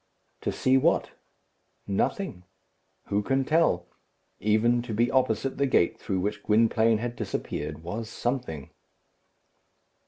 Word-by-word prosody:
To - - -1
see 130 +1 +3
what? - - +2 0.7
Nothing. 100 - -1 0.7
Who 100 +1 +1
can 135 +5 0
tell? 155 - +2 0.5
Even 110 +3 +3
to 120 -3 -5
be 120 +2 +2
opposite 130 +1 +1
the 140 - +3
gate 85 -9 +2
through 95 -2 -2
which 105 +1 -2
Gwynplaine 110 +1 +3
had 120 +2 -4
disappeared 75 -7 -4
was 110 +6 -5
something. 120 - -3
115 Hz, 120 wpm, -27 LUFS, 100-130 Hz, 0.7 s, see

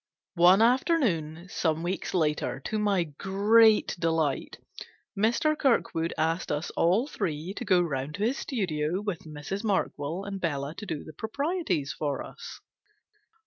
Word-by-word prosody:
One 185 +5 +7
afternoon, 225 - +1
some 160 -1 0
weeks 185 +2 -3
later, 150 -5 0
to 215 +10 -2
my 200 -4 +2
great 205 +8 +3
delight, 160 -4 0 0.6
Mr. 235 +9 +2
Kirkwood 180 - +1
asked 165 +3 0
us 150 +3 -2
all 185 +9 +2
three 180 - -3
to 225 - -5
go 190 -5 +4
round 145 -3 -3
to 200 - -3
his 245 +5 0
studio, 175 - -1
with 205 -6 -4
Mrs. 155 +7 -5
Markwell 180 -4 -1
and 195 -1 -5
Bella 145 -3 -2
to 210 - -8
do 155 -4 -4
the 155 - -11
proprieties 220 - -2
for 145 -2 -2
us. - - -10
180 Hz, 145 wpm, -28 LUFS, 155-215 Hz, 0.6 s, One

